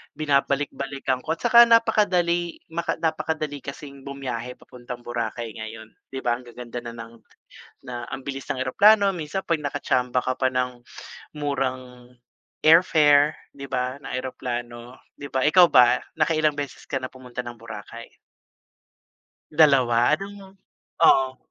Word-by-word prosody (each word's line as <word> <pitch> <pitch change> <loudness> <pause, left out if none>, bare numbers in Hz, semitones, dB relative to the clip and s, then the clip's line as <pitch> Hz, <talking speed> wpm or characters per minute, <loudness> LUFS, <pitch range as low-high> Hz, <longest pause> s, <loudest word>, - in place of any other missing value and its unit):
Binabalik-balikan 140 -2 -1
ko 160 +5 -3
at 165 - -17
tsaka 235 0 +7
napakadali 185 -7 +2
maka 170 +1 -2
napakadali 160 -2 -2
kasing 140 0 -10
bumiyahe 125 -3 -5
papuntang 120 -1 -10
Boracay 120 -1 -4
ngayon, 110 0 -9 0.2
di 135 0 -7
ba? 120 0 0
Ang 125 - -16
gaganda 120 0 -7
na 120 -1 -8
ng 115 0 -10 0.7
na 120 -1 -5
ang 135 - -4
bilis 135 -1 -4
ng 130 - -4
eroplano, 200 +11 +5
minsan 170 +3 -4
'pag 165 -2 0
nakatsamba 130 -3 0
ka 130 0 -2
pa 130 0 0
ng 125 -1 -2 0.5
murang 130 -4 -4 0.5
airfare, 155 -3 +5 0.2
di 140 - -8
ba, 130 0 -2
na - - -6
eroplano, 120 -1 -5 0.2
di 140 - -8
ba? 130 - +1
Ikaw 180 +2 +7
ba, 125 -3 +6 0.2
nakailang 155 -1 +2
beses 145 -2 -6
ka 135 - -3
na 130 - -4
pumunta 125 -1 -8
ng 120 -1 -9
Boracay? 110 -2 -10 1.4
2 130 -6 +4
anong 195 0 -6 0.4
Oo. 130 -1 +4
135 Hz, 135 wpm, -24 LUFS, 125-155 Hz, 1.4 s, tsaka